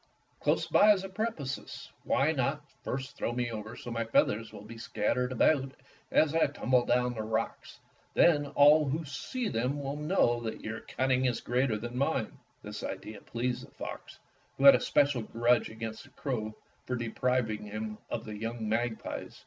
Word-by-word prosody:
Close - - +1
by 210 - +6
is 190 -2 -3
a 195 - -6
precipice. 190 - -4
Why - - +3
not - - -1 0.2
first 130 0 -4
throw 120 - -2
me 120 -1 -1
over 110 -1 -5
that - - -11
so 120 - -6
my 115 0 -1
feathers 115 0 +1
will 100 - -10
be 115 +2 -10
scattered 125 +3 -1
about 135 +1 +2 0.4
as 155 -1 +3
I 165 - +4
tumble 130 -3 +1
down 125 0 +2
the 110 - -4
rocks 110 0 -3 0.4
Then 145 -4 +5
all 150 +2 +6
who 155 +4 -2
see 245 - -4
them 125 - -1
will 140 0 -3
know 150 -6 +2
that 115 -1 -5
your 110 +1 -5
cunning 130 0 0
is 125 -2 +1
greater 125 -2 +1
than 120 +3 -5
mine." 140 -5 -1 0.2
This - - -6
idea 105 -2 -6
pleased 120 +1 -3
the - - -20
fox, - - -8 0.4
who 135 - -2
had 140 - +11
a - - +4
special 140 -4 +2
grudge 120 +2 +2
against 110 0 -6
the - - -17
crow 110 -6 -4 0.3
for 125 - -1
depriving 115 -2 -1
him 110 +1 -5
of - - -4
the 110 - -6
young 115 +1 -4
magpies. 110 +1 -3
125 Hz, 180 wpm, -30 LUFS, 110-140 Hz, 0.4 s, had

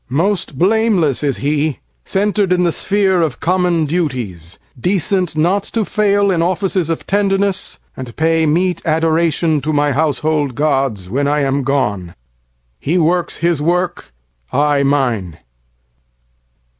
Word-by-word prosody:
Most 175 +1 -1
blameless 190 - +2
is 140 -2 0
he, 150 0 0 0.3
centred 200 -1 0
in 180 0 +3
the 170 - +2
sphereOf 190 -7 0
common 175 -2 +1
duties, 125 - -3 0.2
decent 180 +1 0
not 180 +6 +2
to 230 - -2
failIn 200 -4 +1
offices 180 0 0
of 165 - -3
tenderness, 195 -1 0 0.2
and 125 -3 -8
payMeet 165 +3 +1
adoration 160 -1 +1
to 150 +4 -2
my 145 -1 +1
household 150 -1 0
gods, 135 -9 0
When 140 +8 -1
I 150 +1 +1
am 140 0 0
gone. 105 -11 -1 0.6
He 165 +6 0
works 175 +1 +1
his 170 -4 +1
work, 175 - -1 0.4
I 145 +1 +2
mine. 120 - 0
160 Hz, 120 wpm, -16 LUFS, 140-180 Hz, 0.6 s, in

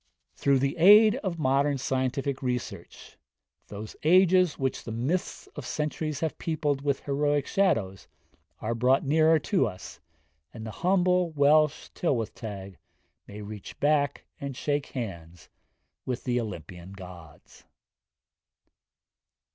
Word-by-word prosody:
Through 140 -1 +2
the 135 +1 -1
aid 210 +6 +7
of 190 -10 -3
modern 140 -1 +2
scientific 130 +1 -2
research, 125 -2 -5 0.5
'those 105 +1 -8
ages 180 0 +4
which 135 -1 -2
the 115 - -6
myths 135 +11 -2
of 145 - -6
centuries 150 +2 -3
have 160 -2 -2
peopled 150 -4 -1
with 140 -1 -1
heroic 145 0 0
shadows' 115 - 0 0.5
are 110 +2 -1
brought 125 +4 +2
nearer 160 +3 +4
to 155 - +1
us, 90 -3 -9 0.6
and 110 -1 -7
the 110 - -5
humble 180 - +2
Welsh 150 0 +3
Tylwyth 120 -10 -1
Teg 100 -4 -8 0.5
may 105 +1 -8
reach 105 -1 -9
back 145 -1 +1
and 140 -2 -6
shake 145 -1 -1
hands 85 - -7 0.5
with 125 -2 -4
the 125 -1 0
Olympian 90 -3 -8
gods. 90 -5 -13
140 Hz, 125 wpm, -27 LUFS, 115-155 Hz, 0.6 s, aid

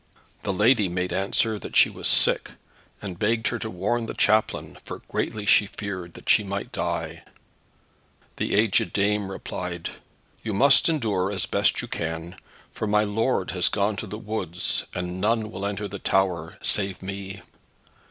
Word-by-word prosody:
The - - -1
lady 105 +1 +4
made 90 +1 -2
answer 105 +3 +1
that - - -8
she - - +8
was - - -3
sick, - - +2 0.5
and 95 -3 -6
begged 110 +2 +1
her 120 - -3
to 110 - -4
warn 110 +5 -1
the - - -5
chaplain, 110 +1 +1
for - - -8
greatly 105 -1 -2
she 105 0 +5
feared 95 -4 -6
that - - -13
she 105 - +5
might 100 0 -4
die. - - -3 1.2
The - - -1
agèd 105 -5 +3
dame 105 0 +1
replied, 90 -3 -5 0.5
"You 110 -3 -3
must 140 - +6
endure 105 - 0
as 100 - 0
best - - +2
you - - -5
may, 80 +1 -3 0.4
for 110 - -3
my 105 0 +3
lord 105 -1 0
has 90 -2 +2
gone 105 +1 +1
to 110 - -4
the 105 - -6
woods, 100 -6 -2
and 90 +1 -3
none 110 +1 +1
will 100 0 -3
enter 100 0 -3
in 100 - -5
the 100 - -5
tower, 90 -5 0
save 95 -2 +2
me." 95 0 -6
100 Hz, 170 wpm, -25 LUFS, 95-110 Hz, 1.2 s, she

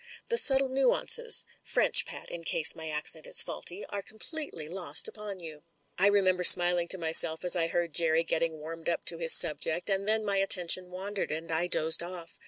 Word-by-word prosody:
The 470 - 0
subtle 270 -1 +5
nuances 275 - +2 0.2
(French, - - +1
Pat, - - -11
in 170 - -10
case 160 -1 +3
my 160 -1 -10
accent 155 +1 0
is - - +4
faulty) 180 +4 -7
are 200 - -7
completely 220 - -8
lost 170 -4 0
upon 210 -3 -8
you." 160 -3 -11 0.4
I 195 - +3
remember 185 -3 -1
smiling 175 -1 +5
to 190 - -1
myself 160 0 +2
as 180 - +4
I 165 -2 -2
heard 170 -1 -6
Jerry 165 0 +1
getting 165 -1 -5
warmed 165 +2 -10
up 170 - -6
to 165 - 0
his 165 -1 +5
subject, 170 +3 -1
and 195 +1 -4
then 220 0 -2
my 200 -1 -3
atten 185 -3 +1
tion 180 0 +3
wandered, 195 +2 -7
and 160 +2 -7
I 165 +2 -3
dozed 160 -2 +1
off. 170 -1 -11
175 Hz, 195 wpm, -25 LUFS, 165-200 Hz, 0.4 s, subtle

